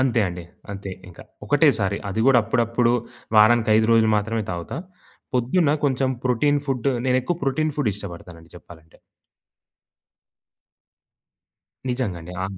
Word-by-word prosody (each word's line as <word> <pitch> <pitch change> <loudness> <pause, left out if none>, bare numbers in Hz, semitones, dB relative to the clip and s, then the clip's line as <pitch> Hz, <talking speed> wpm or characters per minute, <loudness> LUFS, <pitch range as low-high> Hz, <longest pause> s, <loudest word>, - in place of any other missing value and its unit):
అంతే 125 -3 +2
అండి. 90 -1 -7 0.3
అంతే 100 0 -6 0.2
ఇంక 90 - -16 0.3
ఒకటేసారి. 95 +1 +2
అది 105 +3 -2
కూడా 135 -2 +6
అప్పుడప్పుడు 115 +1 +1 0.4
వారానికి 110 +1 +5
5 110 0 +3
రోజులు 110 -1 +4
మాత్రమే 110 +2 -1
తాగుతా. 85 -1 -5 0.6
పొద్దున్న 140 +6 +2
కొంచెం 130 -1 +1
ప్రోటీన్ 145 +4 +2
ఫుడ్డు 135 -1 0 0.2
నేనెక్కువ 130 +6 +1
ప్రోటీన్ 150 +3 0
ఫుడ్ 145 -7 +1
ఇష్టపడతానండి 85 -4 -10
చెప్పాలంటే. 80 -2 -16 2.9
నిజంగండి. 95 -9 -3
అవును. 95 0 -5
115 Hz, 115 wpm, -23 LUFS, 95-130 Hz, 2.9 s, కూడా